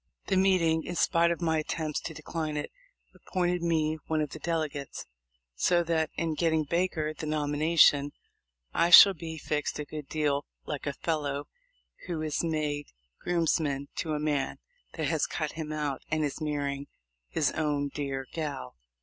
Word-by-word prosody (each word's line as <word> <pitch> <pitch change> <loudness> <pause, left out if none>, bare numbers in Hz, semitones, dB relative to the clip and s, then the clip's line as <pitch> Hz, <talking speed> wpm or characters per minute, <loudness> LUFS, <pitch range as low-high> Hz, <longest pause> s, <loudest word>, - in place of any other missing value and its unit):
The 195 - +1
meeting, 180 -4 +3
in 175 - -5
spite 170 0 +3
of 170 0 -2
my 160 -1 +2
attempt 155 0 -3
to 165 - -4
decline 155 -2 -3
it, 145 - -4 0.4
appointed 180 -1 -1
me 160 -2 +1
one 160 -1 +1
of 150 -2 -1
the 155 - -7
delegates; 155 -4 -3 0.5
so 175 - +2
that 160 -2 +1
in 165 -1 -1
getting 160 0 +2
Baker 160 -1 0
the 155 +1 -6
nomination 150 -1 +4 0.6
I 170 - +3
shall 195 +3 +11
be 160 -1 -7
fixed 150 -1 -2
a 150 - -4
good 150 -1 -7
deal 145 -2 0 0.2
like 145 -1 -4
a 140 - -1
fellow 145 -3 -2 0.6
who 170 -3 -2
is 155 +1 -1
made 150 -3 -1 0.3
grooms 170 -3 +1
man 140 -2 -2
to 155 -2 -1
a - - -1
man 150 -2 -1 0.4
that - - -2
has - - +1
cut - - -2
him 155 -2 -5
out, 150 -3 -2
and 155 -1 +1
is 145 +2 -4
marrying 145 -2 -2 0.4
his 150 - +1
own 145 -2 0
dear 135 -2 -3
gal." 145 - -4
155 Hz, 165 wpm, -29 LUFS, 145-165 Hz, 0.6 s, shall